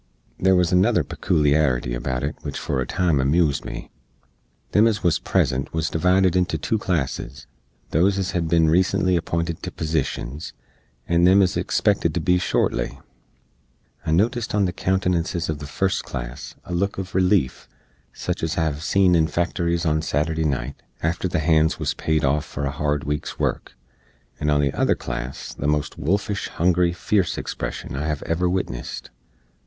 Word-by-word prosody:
There 95 Hz, 0 st, +4 dB
wuz 90 Hz, -1 st, +2 dB
another 90 Hz, 0 st, +3 dB
pekooliarity 70 Hz, -5 st, +1 dB
about 65 Hz, +1 st, -3 dB
it 75 Hz, +2 st, -2 dB
which -, -, -5 dB
for 65 Hz, -, -2 dB
a -, -, -3 dB
time 85 Hz, -6 st, +1 dB
amoozed 70 Hz, +2 st, +2 dB
me. -, -, -7 dB, 0.8 s
Them 105 Hz, +3 st, +5 dB
ez 110 Hz, -3 st, -1 dB
wuz 85 Hz, -4 st, +3 dB
present 65 Hz, +1 st, 0 dB
wuz 80 Hz, -1 st, -1 dB
divided 90 Hz, +2 st, +3 dB
into 90 Hz, -2 st, +1 dB
2 110 Hz, +8 st, -1 dB
classes 75 Hz, -6 st, -2 dB, 0.5 s
those 95 Hz, +5 st, +3 dB
ez 95 Hz, -1 st, -1 dB
hed 85 Hz, -3 st, -1 dB
bin 80 Hz, 0 st, +3 dB
recently 95 Hz, +2 st, +3 dB
appinted 85 Hz, -1 st, -2 dB
to -, -, -4 dB
posishens, 75 Hz, -2 st, -3 dB, 0.5 s
and 85 Hz, +1 st, +4 dB
them 95 Hz, +2 st, +6 dB
ez 90 Hz, -, 0 dB
expected -, -, +1 dB
to -, -, +1 dB
be 90 Hz, 0 st, +2 dB
shortly. -, -, 0 dB, 1.0 s
I -, -, -4 dB
notist 110 Hz, +8 st, +1 dB
on 100 Hz, -2 st, +3 dB
the 90 Hz, -, -2 dB
countenances 90 Hz, -2 st, 0 dB
uv 75 Hz, -2 st, -2 dB
the 75 Hz, -, -7 dB
first 95 Hz, +6 st, 0 dB
class -, -, -7 dB
a 90 Hz, -, -6 dB
look 100 Hz, +3 st, 0 dB
uv 95 Hz, 0 st, -5 dB
releef, 90 Hz, -7 st, +1 dB, 0.4 s
sich -, -, -4 dB
ez 80 Hz, +1 st, -2 dB
I 85 Hz, -, +2 dB
hev 75 Hz, -2 st, -2 dB
seen 95 Hz, +2 st, +3 dB
in 80 Hz, -2 st, +4 dB
factories 85 Hz, +1 st, -1 dB, 0.2 s
Saturday 80 Hz, +2 st, 0 dB
nite, 70 Hz, -2 st, -2 dB, 0.2 s
after 85 Hz, +3 st, 0 dB
the -, -, -1 dB
hands 80 Hz, 0 st, +3 dB
wuz -, -, -2 dB
paid 80 Hz, -2 st, 0 dB
off 75 Hz, +2 st, +1 dB
for 75 Hz, -1 st, -5 dB
a 70 Hz, -, -1 dB
hard 75 Hz, 0 st, -1 dB
week's 75 Hz, +1 st, -3 dB
work; -, -, -2 dB, 0.6 s
and 75 Hz, -, 0 dB
on 75 Hz, -1 st, +3 dB
the 70 Hz, -2 st, 0 dB
other -, -, +2 dB
class -, -, -6 dB
the 70 Hz, -, -3 dB
most 75 Hz, 0 st, -1 dB
wolfish, 100 Hz, +6 st, -1 dB
hungry, 90 Hz, 0 st, +2 dB
fierce 95 Hz, +1 st, 0 dB
expression -, -, -5 dB
I 75 Hz, +3 st, -2 dB
hev 75 Hz, -2 st, -2 dB
ever 90 Hz, +2 st, 0 dB
witnessed. 95 Hz, +1 st, -4 dB
80 Hz, 170 wpm, -23 LUFS, 75-90 Hz, 1.0 s, them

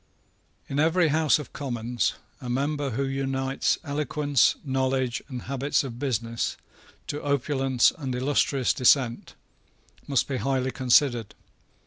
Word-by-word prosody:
In 140 Hz, -, -2 dB
every 165 Hz, +2 st, +3 dB
House 155 Hz, 0 st, +3 dB
of 150 Hz, -, -9 dB
Commons, 120 Hz, -3 st, -2 dB, 0.3 s
a 125 Hz, -, -6 dB
member 140 Hz, +3 st, -1 dB
who 130 Hz, +3 st, -2 dB
unites 135 Hz, 0 st, -1 dB
eloquence, 145 Hz, -3 st, +1 dB
knowledge, 130 Hz, -2 st, 0 dB
and 125 Hz, -4 st, -6 dB
habits 140 Hz, +4 st, 0 dB
of 120 Hz, -3 st, -7 dB
business, 115 Hz, -4 st, -2 dB, 0.5 s
to 145 Hz, -, -5 dB
opulence 135 Hz, -2 st, +2 dB
and 130 Hz, -4 st, -3 dB
illustrious 135 Hz, 0 st, +1 dB
descent, 125 Hz, -2 st, +2 dB, 0.7 s
must 140 Hz, -3 st, +1 dB
be 135 Hz, -, -2 dB
highly 130 Hz, 0 st, 0 dB
considered. 125 Hz, -3 st, +2 dB
135 Hz, 120 wpm, -26 LUFS, 125-145 Hz, 0.7 s, every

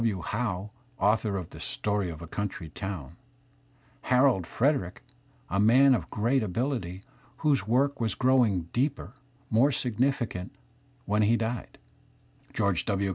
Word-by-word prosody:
W. 105 Hz, -6 st, 0 dB
Howe, 105 Hz, -2 st, -3 dB, 0.3 s
author 105 Hz, -1 st, +2 dB
of 90 Hz, -3 st, -6 dB
"The -, -, -11 dB
Story 105 Hz, -3 st, -2 dB
of 80 Hz, 0 st, -8 dB
a -, -, -8 dB
Coimtry 90 Hz, -3 st, -5 dB
Town"; 85 Hz, -5 st, -6 dB, 0.9 s
Harold^JVedgjic, 125 Hz, -, +2 dB, 0.5 s
a 95 Hz, -, -1 dB
man 130 Hz, +6 st, +6 dB
of 95 Hz, -10 st, -1 dB
great 120 Hz, +5 st, +1 dB
abiUty, 100 Hz, -3 st, -2 dB, 0.4 s
whose 135 Hz, -9 st, +2 dB
work 140 Hz, +4 st, +2 dB
was 110 Hz, -3 st, 0 dB
growing 125 Hz, -8 st, +3 dB
deeper, 130 Hz, -3 st, -1 dB, 0.4 s
more 120 Hz, +6 st, +4 dB
significant 120 Hz, -7 st, -1 dB, 0.5 s
when 105 Hz, +1 st, +1 dB
he 110 Hz, +3 st, +4 dB
died; 115 Hz, +2 st, -4 dB, 0.7 s
George 95 Hz, -4 st, +1 dB
W. 100 Hz, -1 st, 0 dB
105 Hz, 130 wpm, -28 LUFS, 95-125 Hz, 0.9 s, man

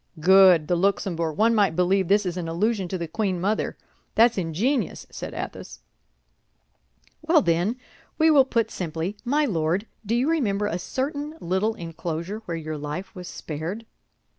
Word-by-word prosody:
_" -, -, -11 dB
"Good, 185 Hz, -2 st, +6 dB
the 175 Hz, -, +2 dB
Luxembourg! 170 Hz, -3 st, 0 dB
One 225 Hz, +2 st, +4 dB
might 200 Hz, -7 st, +2 dB
believe 185 Hz, +1 st, +2 dB
this 205 Hz, +2 st, +3 dB
is 175 Hz, -1 st, -2 dB
an 175 Hz, -2 st, -4 dB
allusion 195 Hz, +4 st, 0 dB
to 185 Hz, -, -3 dB
the 170 Hz, -1 st, -4 dB
queen 190 Hz, +1 st, -1 dB
mother! 205 Hz, +5 st, -1 dB, 0.4 s
That's 235 Hz, +1 st, +5 dB
ingenious," 195 Hz, -, -1 dB
said -, -, -7 dB
Athos. -, -, -7 dB, 1.4 s
"Well, -, -, +4 dB
then, 175 Hz, +7 st, +1 dB, 0.4 s
we 320 Hz, 0 st, +5 dB
will 280 Hz, -3 st, +6 dB
put 230 Hz, -3 st, 0 dB
simply, 165 Hz, +2 st, -3 dB
_My 295 Hz, +3 st, +2 dB
Lord, 175 Hz, 0 st, 0 dB, 0.2 s
do 225 Hz, +2 st, -1 dB
you 250 Hz, +4 st, +1 dB
remember 215 Hz, -11 st, +1 dB
a 180 Hz, -3 st, -2 dB
certain 285 Hz, -, -3 dB
little 190 Hz, +4 st, 0 dB
enclosure 170 Hz, +3 st, -5 dB
where 170 Hz, -1 st, -3 dB
your 155 Hz, -1 st, -5 dB
life 150 Hz, +6 st, -5 dB
was 180 Hz, -1 st, -8 dB
spared? 170 Hz, +9 st, -6 dB
190 Hz, 165 wpm, -25 LUFS, 170-225 Hz, 1.4 s, Good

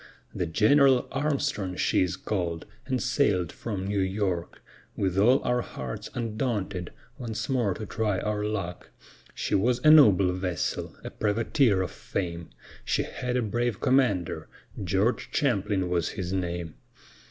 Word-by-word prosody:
The 90 Hz, -, -2 dB
General 130 Hz, -, +4 dB
Armstrong 140 Hz, -9 st, -1 dB
she -, -, +2 dB
is 90 Hz, -2 st, 0 dB
called, 85 Hz, -5 st, -3 dB, 0.2 s
and 130 Hz, -2 st, 0 dB
sailèd 100 Hz, -, +1 dB
from 100 Hz, -5 st, -5 dB
New 100 Hz, 0 st, -1 dB
York, 95 Hz, -2 st, -2 dB, 0.3 s
With 95 Hz, -2 st, 0 dB
all 120 Hz, +7 st, +4 dB
our 125 Hz, 0 st, +1 dB
hearts 65 Hz, -, -6 dB
undaunted, 110 Hz, -6 st, -2 dB, 0.3 s
once 110 Hz, -3 st, -4 dB
more 120 Hz, -8 st, +1 dB
to 110 Hz, -, -6 dB
try 105 Hz, -1 st, -1 dB
our 105 Hz, +1 st, -2 dB
luck; 100 Hz, -5 st, -4 dB, 0.5 s
She -, -, -3 dB
was 120 Hz, +5 st, +3 dB
a 155 Hz, -, +8 dB
noble 100 Hz, -12 st, +7 dB
vessel, 90 Hz, -2 st, -3 dB
a -, -, -6 dB
privateer 110 Hz, -1 st, +2 dB
of 85 Hz, -, -5 dB
fame: 85 Hz, -3 st, -4 dB, 0.3 s
She -, -, 0 dB
had 125 Hz, 0 st, -3 dB
a 125 Hz, -, +1 dB
brave 120 Hz, 0 st, -1 dB
commander, 125 Hz, -, +1 dB, 0.4 s
George 95 Hz, +6 st, 0 dB
Champlin 105 Hz, -8 st, 0 dB
was 85 Hz, -3 st, 0 dB
his 95 Hz, -2 st, -4 dB
name. 85 Hz, -3 st, -3 dB
105 Hz, 140 wpm, -27 LUFS, 90-120 Hz, 0.5 s, a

